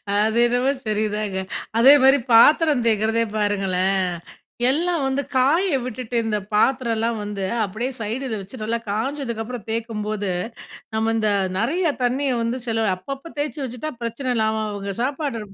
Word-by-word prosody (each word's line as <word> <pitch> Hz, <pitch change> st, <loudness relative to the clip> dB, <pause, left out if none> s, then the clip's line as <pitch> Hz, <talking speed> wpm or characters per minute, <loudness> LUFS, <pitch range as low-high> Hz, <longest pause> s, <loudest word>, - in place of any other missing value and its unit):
அது 215 Hz, +2 st, +2 dB
என்னமோ 245 Hz, +3 st, +2 dB, 0.2 s
சரிதாங்க. 210 Hz, -2 st, -1 dB, 0.4 s
அதே 260 Hz, +5 st, +8 dB
மாதி 270 Hz, +1 st, +7 dB, 0.2 s
பாத்திரம் 295 Hz, +2 st, +6 dB
தேய்கிறதே 225 Hz, +1 st, +2 dB
பாருங்களேன், 195 Hz, -2 st, +1 dB, 0.6 s
எல்லாம் 330 Hz, +2 st, +1 dB
வந்து 270 Hz, +1 st, 0 dB, 0.2 s
காய 315 Hz, +8 st, +3 dB
விட்டுட்டு 250 Hz, -1 st, -5 dB
இந்த 215 Hz, -1 st, 0 dB, 0.2 s
பாத்திரம்லாம் 230 Hz, -1 st, +1 dB
வந்து, 205 Hz, -2 st, -4 dB, 0.2 s
அப்படியே 220 Hz, +7 st, -3 dB
சைடில 225 Hz, +1 st, -3 dB
வச்சு 205 Hz, +5 st, -10 dB
நல்லா 230 Hz, +2 st, -1 dB
காஞ்சதுக்கு 235 Hz, +1 st, -2 dB
அப்புறம் 235 Hz, -2 st, -7 dB
தேய்க்கும்போது, 215 Hz, -3 st, -2 dB, 0.6 s
நம்ம 225 Hz, +1 st, +1 dB
இந்த 215 Hz, -1 st, +1 dB, 0.3 s
நிறைய 310 Hz, -, +1 dB
தண்ணீய 260 Hz, +2 st, +1 dB
வந்து 235 Hz, +3 st, -2 dB
செலவு 225 Hz, -3 st, +1 dB
அப்பப்போ 275 Hz, -, -8 dB
தேய்ச்சு 290 Hz, -1 st, -2 dB
வச்சுட்டா 255 Hz, +5 st, -5 dB
பிரச்சனை 245 Hz, +3 st, -2 dB
இல்லாம 220 Hz, 0 st, +1 dB
அவுங்க 200 Hz, -1 st, -4 dB
சாப்பாடு 275 Hz, -2 st, -2 dB
230 Hz, 135 wpm, -22 LUFS, 215-265 Hz, 0.6 s, அதே